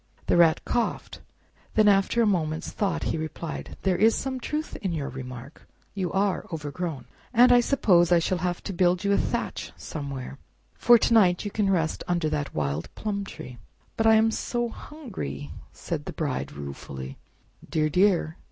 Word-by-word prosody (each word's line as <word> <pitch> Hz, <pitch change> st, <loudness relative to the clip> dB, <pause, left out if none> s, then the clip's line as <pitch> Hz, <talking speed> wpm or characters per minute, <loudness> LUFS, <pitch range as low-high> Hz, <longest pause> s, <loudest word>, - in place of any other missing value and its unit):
The -, -, +2 dB
Rat 170 Hz, -2 st, +4 dB
coughed; 240 Hz, -1 st, -2 dB, 0.5 s
then 215 Hz, -1 st, +5 dB
after 200 Hz, +4 st, +4 dB
a -, -, +3 dB
moment's 160 Hz, -6 st, -1 dB
thought 200 Hz, -2 st, -1 dB
he -, -, -1 dB
replied, 160 Hz, +1 st, -6 dB
"There 185 Hz, -2 st, +2 dB
is 220 Hz, +3 st, +5 dB
some 265 Hz, -1 st, -3 dB
truth 305 Hz, +4 st, -4 dB
in 190 Hz, -5 st, -3 dB
your 145 Hz, -4 st, -3 dB
remark—you 130 Hz, +8 st, -8 dB
are 195 Hz, 0 st, +1 dB
overgrown, 155 Hz, -2 st, -4 dB, 0.3 s
and 245 Hz, +1 st, +6 dB
I 245 Hz, -, +7 dB
suppose 185 Hz, -9 st, +3 dB
I 175 Hz, -, +7 dB
shall 175 Hz, +2 st, 0 dB
have 175 Hz, 0 st, -2 dB
to 195 Hz, -, -4 dB
build 180 Hz, +1 st, +2 dB
you 200 Hz, -, +1 dB
a 200 Hz, -, +4 dB
thatch -, -, -3 dB
somewhere, 140 Hz, -3 st, -6 dB, 0.3 s
For 240 Hz, 0 st, +6 dB
to 230 Hz, -, +1 dB
night 185 Hz, -4 st, +4 dB
you 205 Hz, -, -3 dB
can 205 Hz, -1 st, +1 dB
rest 165 Hz, -4 st, 0 dB
under 170 Hz, -3 st, 0 dB
that 145 Hz, -1 st, -3 dB
wild 75 Hz, +1 st, -2 dB
plum 200 Hz, -2 st, -3 dB
tree." 125 Hz, -9 st, -10 dB, 0.4 s
"But 225 Hz, -, +2 dB
I 220 Hz, -, +7 dB
am 220 Hz, +1 st, +4 dB
so 240 Hz, +1 st, -2 dB
hungry!" 190 Hz, -, -7 dB, 0.2 s
said 145 Hz, -, -5 dB
the -, -, -6 dB
Bride 145 Hz, -5 st, -3 dB
ruefully. 70 Hz, -2 st, -8 dB, 0.5 s
"Dear, 155 Hz, -1 st, +1 dB
dear! 180 Hz, -2 st, +2 dB
180 Hz, 170 wpm, -26 LUFS, 150-210 Hz, 0.5 s, I